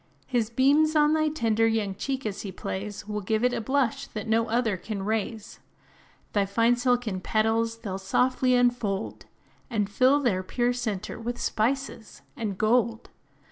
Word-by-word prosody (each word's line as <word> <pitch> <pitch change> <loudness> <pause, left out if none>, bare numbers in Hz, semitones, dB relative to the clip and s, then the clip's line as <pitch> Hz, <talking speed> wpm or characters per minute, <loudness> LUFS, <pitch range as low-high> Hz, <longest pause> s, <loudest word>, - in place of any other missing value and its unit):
His 235 -4 0
beams, 285 +6 +3
on 300 0 +4
thy 310 0 +2
tender 225 -6 +1
young 220 -3 0
cheek 265 +6 -4
as 205 -2 -3
he 200 - -6
plays, 205 +2 -6
Will 210 0 -3
give 220 +3 0
it 250 0 +3
a - - -1
blush 275 +2 0
that 215 0 -6
no 225 +1 +2
other 225 -2 +1
can 195 +2 -5
raise; 220 0 -3 0.7
Thy 205 - +3
fine 230 +4 +3
silken 240 -6 0
petals 225 +2 +1
they 230 -3 -7
'll 190 - -3
softly 255 +6 +2
unfold, 240 -5 0 0.4
And 215 -5 0
fill 255 +7 +3
their 225 -10 +1
pure 240 +6 0
centre 225 -5 -4
with 240 +1 -4
spices 245 0 -2
and 215 -7 -3
gold. 230 +1 +1
230 Hz, 165 wpm, -26 LUFS, 210-250 Hz, 0.7 s, on